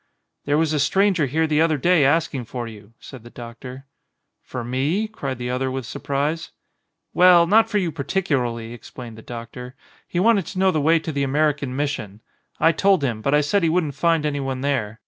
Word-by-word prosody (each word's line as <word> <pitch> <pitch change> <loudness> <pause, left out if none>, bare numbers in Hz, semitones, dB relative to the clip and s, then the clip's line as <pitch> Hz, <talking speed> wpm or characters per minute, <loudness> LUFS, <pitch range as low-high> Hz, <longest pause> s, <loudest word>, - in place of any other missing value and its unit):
"There 145 +1 +1
was 160 -1 +1
a 150 - +1
stranger 190 +1 +2
here 160 +5 +1
the 155 0 +1
other 160 -2 +2
day 170 +2 +3
ask 160 +4 +2
ing 130 -3 -3
for 120 0 -6
you," 105 -1 -13
said 130 -4 -11
the 120 - -13
doctor. 125 +3 -10 0.6
"For 125 - -6
me?" 140 - -1
cried 140 - -5
the 125 0 -4
other 130 +1 -1
with 130 -1 -4
surprise. 150 +7 -3 0.6
"Well, 180 -1 +6
not 220 +5 +4
for 210 - 0
you 180 -5 0
particularly," 130 -8 -2
explained 120 -1 -10
the 110 - -12
doctor. 120 +2 -9 0.3
"He 175 - -2
wanted 200 -3 +3
to 190 - -7
know 190 0 +3
the 155 - 0
way 160 +3 +4
to 160 0 -4
the 140 -2 -2
American 145 -1 0
Mission. 130 -8 -3 0.4
I 165 - +5
told 190 -1 +2
him; 115 -5 -2
but 140 +5 +1
I 150 - +4
said 150 +8 +1
he 165 - +2
wouldn't 160 -3 0
find 165 0 +1
anyone 135 -3 -2
there. 120 -6 -2
145 Hz, 205 wpm, -22 LUFS, 125-165 Hz, 0.6 s, Well